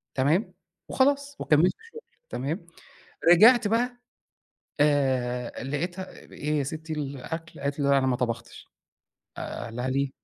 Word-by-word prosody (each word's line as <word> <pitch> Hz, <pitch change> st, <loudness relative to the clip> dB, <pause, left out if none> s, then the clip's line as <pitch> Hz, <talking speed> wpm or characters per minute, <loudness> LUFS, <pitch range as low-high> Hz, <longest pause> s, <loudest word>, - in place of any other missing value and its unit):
تمام، 165 Hz, -, +1 dB, 0.4 s
وخلاص 280 Hz, +1 st, +1 dB
وكمّلت 155 Hz, +4 st, +4 dB, 0.2 s
شُغل 460 Hz, -, -10 dB, 0.3 s
تمام، 145 Hz, +8 st, -3 dB, 0.7 s
رجعت 225 Hz, +6 st, +7 dB
بقى 245 Hz, +3 st, 0 dB, 0.8 s
آآ، 130 Hz, -5 st, +1 dB
لقيتها 175 Hz, +7 st, -3 dB
آآ، -, -, -15 dB
إيه 150 Hz, +1 st, -1 dB
يا -, -, +1 dB
ستي 155 Hz, +4 st, -5 dB
الأكل 150 Hz, +3 st, -5 dB
قالت 140 Hz, +1 st, -2 dB
لي: 140 Hz, -, +2 dB
"لأ، 140 Hz, 0 st, +5 dB
أنا 130 Hz, -, +1 dB
ما 130 Hz, -1 st, +2 dB
طبختش" 115 Hz, -1 st, -4 dB, 0.7 s
آآ، -, -, -5 dB
قال 115 Hz, -, -8 dB
لها: 125 Hz, +1 st, -2 dB
"ليه؟" 135 Hz, +1 st, 0 dB
145 Hz, 140 wpm, -26 LUFS, 130-180 Hz, 0.8 s, رجعت